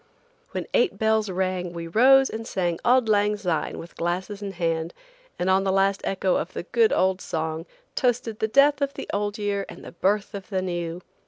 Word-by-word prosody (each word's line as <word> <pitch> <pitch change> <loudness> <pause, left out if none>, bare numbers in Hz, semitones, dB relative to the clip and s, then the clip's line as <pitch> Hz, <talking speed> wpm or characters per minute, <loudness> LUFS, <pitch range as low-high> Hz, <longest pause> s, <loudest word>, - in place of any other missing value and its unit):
When - - -4
eight 485 -6 +2
bells 220 -1 +2
rang 185 -1 -2
we 170 -1 -5
rose 265 +9 +5
and 225 +1 -5
sang 175 -3 -1
Auld 250 -1 +4
Lang 210 0 +2
Syne 175 -6 -2
with 170 - -10
glasses 185 +4 -3
in 200 -1 -5
hand, 165 -2 -2 0.4
and 180 - -1
on 190 +1 +3
the 195 - +1
last 195 0 +2
echo 190 -1 +1
of - - -4
the - - -4
good 450 -1 +2
old 190 0 +2
song 160 +1 -3 0.3
toasted 240 -3 0
the 220 - +1
death 280 +4 +4
of 280 0 -1
the - - -6
old 205 0 -1
year 205 -1 -1
and - - -11
the - - -8
birth 200 +4 0
of 195 -2 -7
the 190 -3 -1
new. 175 -1 -4
195 Hz, 200 wpm, -25 LUFS, 175-220 Hz, 0.4 s, rose